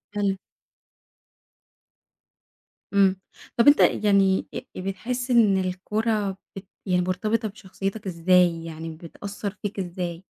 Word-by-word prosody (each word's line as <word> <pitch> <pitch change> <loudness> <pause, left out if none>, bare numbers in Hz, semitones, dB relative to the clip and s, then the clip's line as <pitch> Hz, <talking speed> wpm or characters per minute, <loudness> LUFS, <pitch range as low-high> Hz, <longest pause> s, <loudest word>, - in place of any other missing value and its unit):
حلو. 200 -2 +1 2.6
امم. 195 -1 +4 0.4
طب 235 - +4
أنتَ 290 - +8 0.3
يعني 195 -2 +3
أ - - -3 0.2
بتحس 240 +7 -3
إن 215 -5 +5
الكورة 195 +2 -1 0.2
بت 195 0 -9 0.2
يعني 180 -2 +2
مرتبطة 215 +5 0
بشخصيتك 195 0 -5
إزاي؟ 175 -1 +3
يعني 160 0 -7
بتأثر 200 +5 -7
فيك 205 -1 -4
إزاي؟ 175 -1 -4
195 Hz, 105 wpm, -25 LUFS, 180-210 Hz, 2.6 s, أنتَ